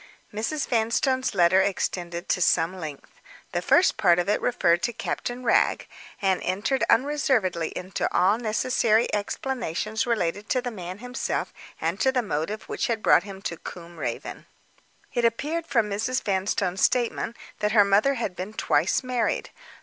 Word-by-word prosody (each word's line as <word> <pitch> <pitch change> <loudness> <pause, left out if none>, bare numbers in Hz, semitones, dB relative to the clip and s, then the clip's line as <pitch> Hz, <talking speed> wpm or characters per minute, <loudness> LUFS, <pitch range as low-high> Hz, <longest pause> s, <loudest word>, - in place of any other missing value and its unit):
Mrs. 225 +8 -2
Vanstone's 255 +2 +1
letter 180 +1 +5
extended 175 -2 -2
to 180 - +1
some 170 +1 +2
length. 155 -6 -8 0.4
The - - -1
first 370 - +4
part 175 -5 +4
of 175 - 0
it 210 - +1
referred 175 -8 +2
to 240 - -1
Captain 245 +2 -4
Wragge, 240 - +2 0.3
and 190 -2 +1
entered 205 +9 0
unreservedly 235 - +2
into 185 +1 -3
all 195 +5 +3
necessary 225 0 +1
explanations 220 0 -2
relating 205 -3 -1
to 255 - +1
the 245 0 -4
man 185 -3 -7
himself 250 +3 -3 0.3
and 165 +5 -2
to 265 - +3
the 255 -2 0
motive 200 +3 -3
which - - -2
had 225 -2 -2
brought - - +6
him 195 0 -9
to 170 - -3
Combe 170 0 -10
Raven. 120 -5 -5 0.7
It 240 - 0
appeared 300 +8 0
from 230 -8 +1
Mrs. 225 +6 -1
Vanstone's 190 -1 -1
statement 235 -1 +1 0.2
that 210 0 0
her 205 -3 +6
mother 210 +8 +3
had 220 -7 -3
been 190 +4 -6
twice 220 - +1
married. 250 -2 -1
210 Hz, 155 wpm, -25 LUFS, 180-245 Hz, 0.7 s, brought